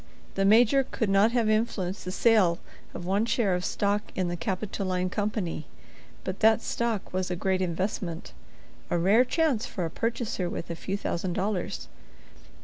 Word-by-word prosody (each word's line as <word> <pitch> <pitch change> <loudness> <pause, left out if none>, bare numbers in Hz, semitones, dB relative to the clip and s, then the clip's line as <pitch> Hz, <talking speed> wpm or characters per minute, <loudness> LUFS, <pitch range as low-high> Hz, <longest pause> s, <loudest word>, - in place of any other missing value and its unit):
The 195 - +1
Major 240 +6 +5
could 225 -5 -2
not 200 +3 +5
have 235 -3 +2
influenced 215 -4 0
the 185 - -3
sale 195 -5 +4 0.4
of 175 - -6
one 195 +4 +2
share 215 -6 +2
of 180 0 -1
stock 205 +2 -1
in 185 -2 0
the 175 - -2
Capitoline 185 0 -2
Company. 205 -7 -2 0.6
But 185 0 -4
that 220 +1 +4
stock 230 -6 -2
was 185 0 -1
a 180 - -1
great 190 +1 0
investment; 180 -1 -3 0.6
a - - +1
rare 200 +8 +5
chance 255 -4 +1
for 180 - -3
a 165 - -4
purchaser 225 -5 -2
with 170 - -5
a - - -3
few 195 +4 -3
thousand 180 -2 -2
dollars. 195 -1 -2
195 Hz, 165 wpm, -27 LUFS, 180-220 Hz, 0.6 s, Major